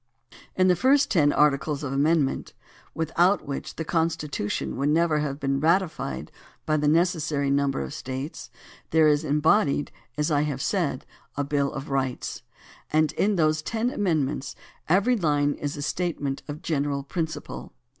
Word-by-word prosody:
In 185 Hz, 0 st, +4 dB
the 180 Hz, -, +5 dB
first 270 Hz, +8 st, +3 dB
ten 150 Hz, -7 st, +4 dB
articles 145 Hz, 0 st, +2 dB
of 135 Hz, -2 st, -3 dB
amendment, 145 Hz, 0 st, +1 dB, 0.4 s
without 170 Hz, +5 st, +2 dB
which 140 Hz, -, -5 dB
the 160 Hz, -, -4 dB
Con 165 Hz, +1 st, +2 dB
stitution 145 Hz, -10 st, -3 dB
would 140 Hz, +2 st, 0 dB
never 160 Hz, 0 st, +3 dB
have 145 Hz, -1 st, -3 dB
been 135 Hz, -1 st, 0 dB
ratified 160 Hz, -, 0 dB, 0.3 s
by 155 Hz, -, +1 dB
the 150 Hz, -1 st, +1 dB
neces 170 Hz, +2 st, +3 dB
sary 145 Hz, -2 st, 0 dB
number 140 Hz, -, +1 dB
of 65 Hz, -, -5 dB
States, 130 Hz, +4 st, -6 dB, 0.4 s
there 160 Hz, -1 st, +5 dB
is 150 Hz, 0 st, +3 dB
embodied, 150 Hz, 0 st, +2 dB, 0.3 s
as 150 Hz, +2 st, 0 dB
I 145 Hz, -1 st, +3 dB
have 145 Hz, -3 st, -2 dB
said, 160 Hz, -6 st, -1 dB, 0.3 s
a 145 Hz, -, +1 dB
bill 140 Hz, -1 st, 0 dB
of 135 Hz, +1 st, -6 dB
rights, 130 Hz, -2 st, -2 dB, 0.5 s
and 155 Hz, 0 st, +3 dB
in 205 Hz, +6 st, +1 dB
those 155 Hz, -2 st, +2 dB
ten 230 Hz, +8 st, -1 dB
amendments 155 Hz, -, -1 dB, 0.3 s
every 200 Hz, +9 st, +4 dB
line 145 Hz, -7 st, +1 dB
is 145 Hz, 0 st, -4 dB
a 145 Hz, -, -4 dB
statement 145 Hz, -4 st, -2 dB
of 145 Hz, -, -4 dB
a -, -, -13 dB
general 140 Hz, -3 st, -1 dB
principle. 160 Hz, -, -5 dB
150 Hz, 165 wpm, -25 LUFS, 140-165 Hz, 0.5 s, the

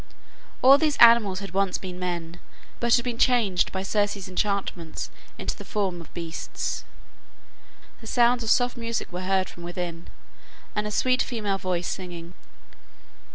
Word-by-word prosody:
All 270 Hz, +2 st, +8 dB
these 305 Hz, -2 st, +1 dB
animals 225 Hz, -5 st, +6 dB
had 195 Hz, -, -7 dB
once 195 Hz, -1 st, +1 dB
been 180 Hz, -1 st, -7 dB
men, 175 Hz, -1 st, -4 dB, 0.4 s
but 235 Hz, -1 st, +4 dB
had 240 Hz, -, 0 dB
been 240 Hz, -2 st, -3 dB
changed 220 Hz, -8 st, +3 dB
by 190 Hz, 0 st, -3 dB
Circe's 205 Hz, 0 st, -1 dB
enchantments 185 Hz, -3 st, -2 dB, 0.3 s
into -, -, -3 dB
the -, -, -9 dB
forms 190 Hz, -4 st, -2 dB
of 165 Hz, -, -15 dB
beasts. 170 Hz, -2 st, -4 dB, 1.2 s
The 225 Hz, -, -11 dB
sounds 240 Hz, +1 st, +3 dB
of 225 Hz, -, -2 dB
soft 245 Hz, +1 st, +3 dB
music 230 Hz, -3 st, -3 dB
were 180 Hz, +1 st, -4 dB
heard 190 Hz, 0 st, +1 dB
from 175 Hz, -, -12 dB
within, 175 Hz, -1 st, -5 dB, 0.7 s
and 210 Hz, 0 st, -1 dB
a -, -, -4 dB
sweet 255 Hz, +4 st, +2 dB
female 210 Hz, -5 st, -1 dB
voice 180 Hz, -2 st, -1 dB
singing. 175 Hz, -2 st, -6 dB
195 Hz, 155 wpm, -25 LUFS, 180-230 Hz, 1.2 s, All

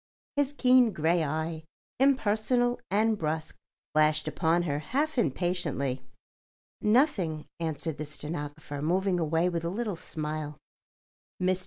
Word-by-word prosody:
His 285 Hz, -1 st, +2 dB
keen 250 Hz, -5 st, +5 dB
grey 165 Hz, +2 st, +2 dB
eye, 160 Hz, +2 st, -2 dB, 0.4 s
impersonal 245 Hz, -2 st, +2 dB
and 220 Hz, +3 st, +3 dB
brusque, 155 Hz, 0 st, -2 dB, 0.4 s
flashed 155 Hz, 0 st, +3 dB
upon 160 Hz, +3 st, +2 dB
her 145 Hz, -4 st, -1 dB
half 285 Hz, -, -1 dB
impatiently. 150 Hz, -, 0 dB, 0.8 s
"Nothing," 210 Hz, -, +2 dB
answered 160 Hz, -1 st, -3 dB
the 155 Hz, -, -3 dB
stenographer, 150 Hz, -1 st, -6 dB
moving 180 Hz, +3 st, +1 dB
away 165 Hz, +2 st, +2 dB
with 170 Hz, -2 st, -1 dB
a 170 Hz, -, -1 dB
little 210 Hz, +1 st, -2 dB
smile. 155 Hz, -2 st, -5 dB, 0.8 s
"Mr. 185 Hz, 0 st, +1 dB
170 Hz, 120 wpm, -29 LUFS, 155-215 Hz, 0.8 s, keen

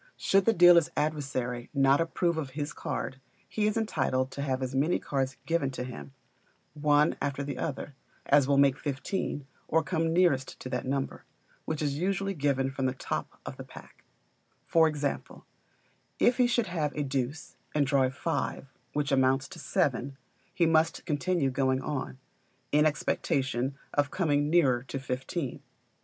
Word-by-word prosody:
Should 195 Hz, 0 st, +3 dB
the 230 Hz, -, +4 dB
dealer's 175 Hz, -2 st, +7 dB
adversary 130 Hz, -5 st, -2 dB
not 135 Hz, +2 st, +4 dB
approve 170 Hz, 0 st, 0 dB
of 145 Hz, -4 st, -4 dB
his 145 Hz, 0 st, -3 dB
card, 135 Hz, 0 st, -4 dB, 0.3 s
he 210 Hz, -1 st, 0 dB
is 215 Hz, -, 0 dB
entitled 130 Hz, -11 st, 0 dB
to 140 Hz, -, -5 dB
have 130 Hz, -2 st, -1 dB
as 130 Hz, 0 st, -3 dB
many 145 Hz, +6 st, +2 dB
cards 135 Hz, -3 st, -2 dB
given 165 Hz, -4 st, +1 dB
to -, -, -2 dB
him, 75 Hz, -, -8 dB, 0.6 s
one 150 Hz, 0 st, +3 dB
after 140 Hz, 0 st, -1 dB
the 140 Hz, -2 st, -5 dB
other, 145 Hz, -1 st, -4 dB, 0.3 s
as 140 Hz, -2 st, +4 dB
will 140 Hz, 0 st, +3 dB
make 140 Hz, -1 st, +4 dB
fifteen, 145 Hz, +1 st, -3 dB, 0.2 s
or 160 Hz, +1 st, +2 dB
come 165 Hz, 0 st, 0 dB
nearest 165 Hz, -7 st, +2 dB
to 130 Hz, -, -6 dB
that 125 Hz, 0 st, -3 dB
number; 135 Hz, 0 st, -2 dB, 0.4 s
which 155 Hz, -1 st, -2 dB
are -, -, +1 dB
usually 190 Hz, +7 st, -1 dB
given 140 Hz, -4 st, 0 dB
from 135 Hz, -1 st, -1 dB
the 130 Hz, -, -2 dB
top -, -, -4 dB
of -, -, -7 dB
the, -, -, -7 dB
pack: -, -, -14 dB, 0.6 s
for 165 Hz, -1 st, +4 dB
example 145 Hz, -2 st, -3 dB, 0.7 s
if 245 Hz, -, +3 dB
he 250 Hz, -1 st, +4 dB
should 235 Hz, -1 st, +1 dB
have 165 Hz, -6 st, -1 dB
a 150 Hz, -, -1 dB
deuce, 135 Hz, +2 st, -3 dB, 0.2 s
and 145 Hz, -2 st, +3 dB
draw 140 Hz, 0 st, +2 dB
a -, -, +1 dB
five, 140 Hz, -1 st, -3 dB, 0.2 s
which 145 Hz, -1 st, -1 dB
amounts 135 Hz, 0 st, +3 dB
to 175 Hz, -, -10 dB
seven, 140 Hz, -, 0 dB, 0.3 s
he 170 Hz, -, +2 dB
must 160 Hz, 0 st, +2 dB
continue 155 Hz, -2 st, 0 dB
going 130 Hz, 0 st, +1 dB
on, 135 Hz, -1 st, -4 dB, 0.5 s
in 150 Hz, +1 st, +5 dB
expectation 135 Hz, -2 st, -1 dB, 0.2 s
of 145 Hz, -1 st, +2 dB
coming 145 Hz, -5 st, +1 dB
nearer 135 Hz, -8 st, +4 dB
to 135 Hz, +2 st, -6 dB
fifteen. 135 Hz, +3 st, -4 dB
145 Hz, 165 wpm, -29 LUFS, 135-160 Hz, 0.7 s, dealer's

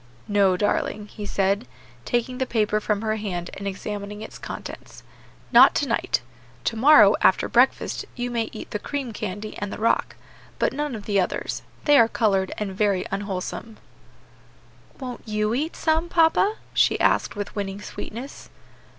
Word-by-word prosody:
"No, 200 Hz, -3 st, +3 dB
darling," 205 Hz, +1 st, -1 dB
he 205 Hz, -1 st, -7 dB
said, 195 Hz, -7 st, 0 dB, 0.4 s
taking 245 Hz, +1 st, -1 dB
the 260 Hz, -, 0 dB
paper 215 Hz, -2 st, +1 dB
from 210 Hz, 0 st, -1 dB
her 220 Hz, 0 st, 0 dB
hand 180 Hz, -5 st, -4 dB
and 200 Hz, -, -6 dB
examining 205 Hz, +2 st, -5 dB
its -, -, -10 dB
contents, -, -, -8 dB, 0.5 s
"not -, -, +8 dB
to -, -, +1 dB
night; -, -, 0 dB, 0.4 s
to 230 Hz, -, -1 dB
morrow, 285 Hz, +7 st, +7 dB
after -, -, +4 dB
breakfast, -, -, +2 dB
you 245 Hz, 0 st, -3 dB
may 230 Hz, -2 st, -1 dB
eat 215 Hz, -, -9 dB
the 210 Hz, -, -2 dB
cream 270 Hz, -1 st, -4 dB
candy 210 Hz, 0 st, -5 dB
and 205 Hz, -1 st, -4 dB
the -, -, -5 dB
rock, 225 Hz, +2 st, +1 dB, 0.4 s
but -, -, +1 dB
none 295 Hz, -2 st, -2 dB
of 205 Hz, -2 st, -8 dB
the 200 Hz, -2 st, +2 dB
others; 180 Hz, -, -2 dB, 0.2 s
they 290 Hz, -1 st, +6 dB
are 230 Hz, -, +6 dB
colored, 195 Hz, -5 st, +1 dB
and 210 Hz, -2 st, -3 dB
very 200 Hz, -2 st, +1 dB
unwholesome." 200 Hz, +3 st, -4 dB, 1.2 s
"Won't 255 Hz, -3 st, -6 dB
you 210 Hz, 0 st, 0 dB
eat 300 Hz, +7 st, -2 dB
some, 320 Hz, +1 st, +1 dB
papa?" 345 Hz, +5 st, +3 dB, 0.2 s
she -, -, +3 dB
asked -, -, +2 dB
with 205 Hz, -1 st, -5 dB
winning 200 Hz, -1 st, -3 dB
sweetness. 235 Hz, +5 st, -8 dB
215 Hz, 160 wpm, -24 LUFS, 200-245 Hz, 1.2 s, not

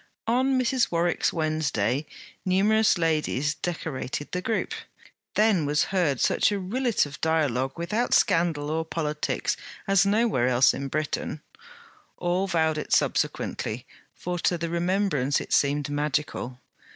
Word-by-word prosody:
On 255 Hz, +3 st, +2 dB
Mrs. 255 Hz, 0 st, +1 dB
Warwick's 175 Hz, 0 st, +1 dB
Wednesday 150 Hz, -, -1 dB, 0.4 s
numerous 205 Hz, +3 st, +3 dB
ladies 155 Hz, -3 st, 0 dB
decorated 150 Hz, -5 st, -4 dB
the 180 Hz, -, -2 dB
group. 225 Hz, +3 st, -1 dB, 0.6 s
Then 205 Hz, -8 st, +3 dB
was 150 Hz, +1 st, +2 dB
heard 160 Hz, -9 st, +1 dB
such -, -, +2 dB
a 205 Hz, -, 0 dB
rillet 230 Hz, -, 0 dB
of 145 Hz, -1 st, -10 dB
dialogue 140 Hz, -5 st, +1 dB
without 210 Hz, +8 st, 0 dB
scandal 165 Hz, -5 st, +2 dB
or 160 Hz, +1 st, 0 dB
politics, 155 Hz, -2 st, -2 dB, 0.3 s
as 195 Hz, -2 st, +4 dB
nowhere 205 Hz, -, +2 dB
else 125 Hz, +1 st, +4 dB
in 140 Hz, -, -4 dB
Britain; 155 Hz, +2 st, -3 dB, 0.7 s
all 180 Hz, +2 st, 0 dB
vowed 160 Hz, -3 st, +1 dB
it -, -, -7 dB
subsequently; -, -, 0 dB, 0.3 s
for 180 Hz, 0 st, -4 dB
to 175 Hz, -, +1 dB
the 170 Hz, 0 st, -3 dB
remembrance 170 Hz, -5 st, +1 dB
it -, -, -5 dB
seemed 145 Hz, 0 st, +2 dB
magical. 145 Hz, -3 st, -2 dB
165 Hz, 130 wpm, -26 LUFS, 145-195 Hz, 0.7 s, as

